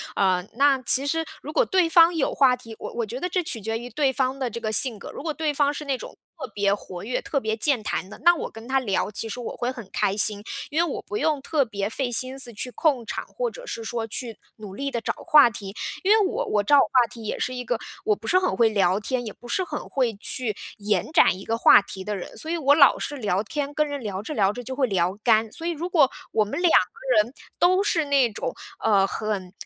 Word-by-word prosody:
呃， 185 Hz, -2 st, +2 dB
那 275 Hz, +1 st, +3 dB
其 265 Hz, +3 st, +2 dB
实， 325 Hz, +3 st, 0 dB, 0.2 s
如 300 Hz, -, -7 dB
果 -, -, +3 dB
对 370 Hz, -5 st, +2 dB
方 335 Hz, +1 st, +6 dB
有 295 Hz, -, 0 dB
话 260 Hz, -2 st, +4 dB
题 235 Hz, -2 st, -12 dB
我 -, -, -7 dB
我 235 Hz, -1 st, -2 dB
觉 235 Hz, +4 st, -6 dB
得 360 Hz, -, -2 dB
这 360 Hz, 0 st, -1 dB
取 235 Hz, -7 st, -2 dB
决 225 Hz, +2 st, -3 dB
于 240 Hz, +2 st, -8 dB
对 265 Hz, +3 st, +1 dB
方 260 Hz, +1 st, -1 dB
的 260 Hz, -2 st, -1 dB
这 235 Hz, +1 st, -7 dB
个 220 Hz, -1 st, -2 dB
性 225 Hz, +1 st, +2 dB
格。 -, -, -9 dB
如 -, -, -8 dB
果 310 Hz, +1 st, -3 dB
对 305 Hz, -1 st, -1 dB
方 285 Hz, 0 st, +2 dB
是 300 Hz, -, -6 dB
那 275 Hz, -3 st, -1 dB
种 -, -, -10 dB, 0.2 s
特 265 Hz, -, -6 dB
别 200 Hz, -1 st, +2 dB
活 185 Hz, -3 st, -7 dB
跃、 245 Hz, +3 st, -2 dB
特 275 Hz, -, -2 dB
别 220 Hz, -1 st, -2 dB
健 250 Hz, -1 st, +1 dB
谈 190 Hz, -2 st, -3 dB
的， -, -, -10 dB
那 345 Hz, +1 st, +7 dB
我 340 Hz, -, -4 dB
跟 225 Hz, +2 st, -12 dB
他 270 Hz, 0 st, +3 dB
聊， 205 Hz, -4 st, -1 dB
其 225 Hz, -, -4 dB
实 235 Hz, +3 st, -6 dB
我 235 Hz, -, -6 dB
会 245 Hz, -, -1 dB
很 235 Hz, -6 st, -8 dB
开 195 Hz, -, 0 dB
心。 210 Hz, -1 st, +1 dB, 0.3 s
因 315 Hz, +2 st, +1 dB
为 345 Hz, -, 0 dB
我 -, -, -5 dB
不 415 Hz, -, -5 dB
用 310 Hz, -8 st, 0 dB
特 280 Hz, -1 st, +1 dB
别 200 Hz, -2 st, -3 dB
费 250 Hz, +2 st, -2 dB
心 255 Hz, +3 st, +1 dB
思 245 Hz, -3 st, +1 dB
去 250 Hz, +4 st, -5 dB
控 265 Hz, -4 st, +1 dB
场， -, -, -4 dB
或 -, -, -3 dB
者 -, -, -11 dB
是 230 Hz, -, -5 dB
说 225 Hz, 0 st, -3 dB
去 225 Hz, 0 st, -6 dB, 0.2 s
努 210 Hz, -3 st, -9 dB
力 275 Hz, +5 st, -3 dB
地 235 Hz, -4 st, -3 dB
找 -, -, -1 dB, 0.2 s
话 300 Hz, -7 st, +7 dB
题。 200 Hz, -2 st, -8 dB, 0.3 s
因 390 Hz, -, +2 dB
为 435 Hz, -1 st, +5 dB
我 475 Hz, +6 st, -2 dB
我 210 Hz, -, 0 dB
找 285 Hz, +8 st, +5 dB
话 250 Hz, -3 st, +3 dB
题 235 Hz, -, -11 dB
也 -, -, -3 dB
是 255 Hz, -, -2 dB
一 250 Hz, -1 st, -5 dB
个 240 Hz, -, 0 dB, 0.3 s
我 210 Hz, -, +3 dB
不 220 Hz, +2 st, -11 dB
是 370 Hz, -, +4 dB
很 370 Hz, -, 0 dB
会 230 Hz, -2 st, +4 dB
聊 195 Hz, -3 st, +2 dB
天， 245 Hz, +4 st, -2 dB
也 215 Hz, -, -6 dB
不 -, -, -19 dB
是 375 Hz, -, +1 dB
很 -, -, -6 dB
会 250 Hz, -4 st, 0 dB
去 215 Hz, +1 st, -4 dB, 0.2 s
延 205 Hz, -, -1 dB
展 315 Hz, -, +4 dB
一 195 Hz, -, -10 dB
个 225 Hz, -, -1 dB
话 230 Hz, -, +7 dB
题 190 Hz, -1 st, -8 dB
的 210 Hz, -, -3 dB
人。 180 Hz, -, -5 dB
所 315 Hz, -, -6 dB
以 340 Hz, -, 0 dB
我 285 Hz, -2 st, +4 dB
老 280 Hz, -3 st, +6 dB
是 290 Hz, -, -4 dB
聊 200 Hz, -6 st, 0 dB
天， 290 Hz, +3 st, -4 dB
跟 300 Hz, 0 st, +1 dB
人 285 Hz, -1 st, -4 dB
聊 200 Hz, -4 st, -4 dB
着 225 Hz, -, -6 dB
聊 200 Hz, -7 st, +2 dB
着 245 Hz, -, -7 dB
就 260 Hz, +2 st, -6 dB
会 265 Hz, -1 st, +2 dB
聊 185 Hz, -1 st, 0 dB
干， 220 Hz, -2 st, +3 dB
所 330 Hz, -, -8 dB
以 345 Hz, -, 0 dB
如 340 Hz, +2 st, -4 dB
果 300 Hz, -7 st, +4 dB, 0.2 s
我 215 Hz, -, +2 dB
们 215 Hz, +11 st, -4 dB
两 350 Hz, -2 st, +4 dB
个 185 Hz, -, +3 dB, 0.2 s
人 235 Hz, +4 st, -13 dB, 0.3 s
都 370 Hz, +2 st, +4 dB
是 345 Hz, -7 st, +1 dB
那 275 Hz, -4 st, +3 dB
种， -, -, -4 dB, 0.3 s
呃， 200 Hz, -3 st, +4 dB
很 200 Hz, -4 st, -4 dB
250 Hz, 285 characters per minute, -24 LUFS, 215-295 Hz, 0.3 s, 那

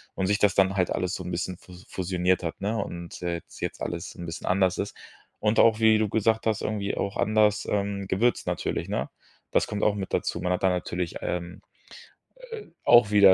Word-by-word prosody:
Und 95 Hz, -, 0 dB
sich 105 Hz, +1 st, +2 dB
das 105 Hz, -2 st, +4 dB
dann 95 Hz, 0 st, +3 dB
halt 90 Hz, -2 st, +1 dB
alles -, -, -1 dB
so -, -, -6 dB
'n -, -, -5 dB
bisschen 90 Hz, -, -3 dB
fus 90 Hz, +1 st, -15 dB
fusioniert 90 Hz, 0 st, 0 dB
hat, 80 Hz, -, -4 dB
ne? 105 Hz, +3 st, -1 dB
Und, 85 Hz, -4 st, -5 dB
äh, 85 Hz, -1 st, -1 dB
jetz 85 Hz, -, -10 dB
jetzt -, -, -4 dB
alles -, -, -4 dB
'n 85 Hz, -, -7 dB
bisschen 80 Hz, -, -6 dB
anders 95 Hz, -1 st, +2 dB
ist. 100 Hz, -, -4 dB, 0.4 s
Und 105 Hz, +1 st, +1 dB
auch, 110 Hz, -1 st, +5 dB
wie 110 Hz, -1 st, +6 dB
du 110 Hz, -, +1 dB
gesagt 110 Hz, +2 st, +1 dB
hast, 110 Hz, -2 st, +1 dB
irgendwie 100 Hz, -2 st, -2 dB
auch 100 Hz, -, -2 dB
anders, 105 Hz, -1 st, +3 dB
ähm, 100 Hz, -1 st, -1 dB
gewürzt 115 Hz, +6 st, +1 dB
natürlich, -, -, -2 dB
ne? -, -, -2 dB, 0.4 s
Das -, -, +3 dB
kommt 105 Hz, -1 st, -3 dB
auch 105 Hz, -, +3 dB
mit 95 Hz, -2 st, -5 dB
dazu. -, -, 0 dB
Man 90 Hz, -, +1 dB
hat 90 Hz, -, -3 dB
da 95 Hz, -, +5 dB
natürlich, 90 Hz, -1 st, -2 dB
ähm, 85 Hz, 0 st, -4 dB, 1.0 s
äh, -, -, -17 dB, 0.2 s
auch 120 Hz, -3 st, +7 dB
wieder 100 Hz, -2 st, +8 dB
100 Hz, 215 wpm, -26 LUFS, 90-105 Hz, 1.0 s, wieder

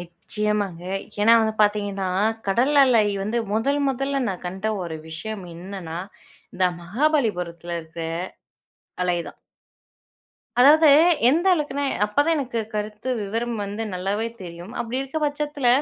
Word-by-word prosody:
நிச்சயமாங்க. 195 Hz, +1 st, -3 dB, 0.4 s
ஏன்னா 225 Hz, +2 st, +6 dB
வந்து 220 Hz, 0 st, 0 dB
பாத்தீங்கன்னா, 205 Hz, -2 st, 0 dB, 0.4 s
கடல் 250 Hz, +9 st, +2 dB
அலை 240 Hz, -5 st, +5 dB, 0.2 s
வந்து 215 Hz, +4 st, -1 dB
முதல் 275 Hz, +7 st, +1 dB
முதல 275 Hz, +1 st, -1 dB
நான் 180 Hz, -2 st, -5 dB
கண்ட 190 Hz, +4 st, -4 dB, 0.2 s
ஒரு 165 Hz, -2 st, -5 dB
விஷயம் 190 Hz, +5 st, -6 dB
இன்னன்னா, 175 Hz, -2 st, -6 dB, 0.6 s
இந்த 185 Hz, -, +1 dB, 0.2 s
மகாபலிபுரத்தில 180 Hz, -, 0 dB
இருக்குற 160 Hz, +1 st, -7 dB, 1.0 s
அலை 180 Hz, -1 st, +1 dB
தான். -, -, -14 dB, 1.2 s
அதாவது, 305 Hz, +4 st, +7 dB, 0.4 s
எந்த 330 Hz, +7 st, +2 dB
அளவுக்குனா 285 Hz, -3 st, -2 dB, 0.2 s
அப்போதான் 290 Hz, +10 st, +2 dB
எனக்கு 245 Hz, -4 st, -3 dB
கருத்து 210 Hz, +4 st, -4 dB
விவரம் 230 Hz, +3 st, -2 dB
வந்து 205 Hz, +2 st, -4 dB
நல்லாவே 195 Hz, +5 st, -1 dB
தெரியும். 175 Hz, +2 st, -9 dB
அப்படி 235 Hz, +2 st, -3 dB
இருக்க 270 Hz, +4 st, -4 dB
பட்சத்துல, 290 Hz, -2 st, -1 dB
210 Hz, 120 wpm, -23 LUFS, 180-265 Hz, 1.2 s, அதாவது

